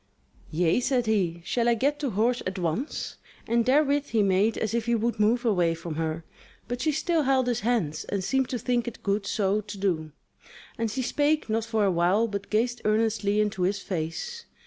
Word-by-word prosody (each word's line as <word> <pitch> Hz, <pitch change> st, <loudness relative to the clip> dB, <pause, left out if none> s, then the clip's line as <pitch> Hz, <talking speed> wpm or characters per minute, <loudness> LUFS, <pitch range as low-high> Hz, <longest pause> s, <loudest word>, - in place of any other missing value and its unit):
"Yea," 165 Hz, +5 st, +2 dB
said 250 Hz, -1 st, +1 dB
he, 180 Hz, -6 st, 0 dB
"Shall 235 Hz, +3 st, +1 dB
I 235 Hz, -, +4 dB
get 285 Hz, +6 st, 0 dB
to 285 Hz, -, -1 dB
horse 235 Hz, +4 st, +1 dB
at 190 Hz, +1 st, -4 dB
once?" 180 Hz, -, -3 dB, 0.3 s
And 235 Hz, +1 st, +1 dB
therewith 285 Hz, +1 st, +3 dB
he 220 Hz, -2 st, +2 dB
made 200 Hz, +3 st, +2 dB
as 220 Hz, -1 st, -2 dB
if 235 Hz, 0 st, -1 dB
he 235 Hz, -, +3 dB
would 230 Hz, 0 st, -1 dB
move 235 Hz, +4 st, +2 dB
away 175 Hz, -7 st, +2 dB
from 165 Hz, 0 st, -6 dB
her; 160 Hz, +1 st, -2 dB, 0.4 s
but 245 Hz, +1 st, -4 dB
she 310 Hz, -, +2 dB
still 320 Hz, +2 st, +1 dB
held 265 Hz, -2 st, +2 dB
his 240 Hz, -1 st, 0 dB
hands, 215 Hz, -10 st, 0 dB
and 200 Hz, -2 st, -2 dB
seemed 265 Hz, +5 st, +1 dB
to 250 Hz, -, -2 dB
think 240 Hz, +1 st, -1 dB
it 240 Hz, -, -7 dB
good 200 Hz, 0 st, 0 dB
so 205 Hz, 0 st, +1 dB
to 205 Hz, 0 st, -9 dB
do, 170 Hz, -6 st, -1 dB, 0.6 s
and 230 Hz, -1 st, -1 dB
she 260 Hz, +4 st, -2 dB
spake 295 Hz, -1 st, +1 dB
not 225 Hz, 0 st, 0 dB
for 220 Hz, -2 st, +1 dB
a 195 Hz, -, +3 dB
while 180 Hz, +6 st, +2 dB
but 200 Hz, -2 st, -5 dB
gazed 240 Hz, +3 st, 0 dB
earnestly 215 Hz, -1 st, +1 dB
into 210 Hz, -2 st, 0 dB
his 190 Hz, +3 st, +1 dB
face. 200 Hz, -, -4 dB
220 Hz, 205 wpm, -27 LUFS, 195-245 Hz, 0.6 s, I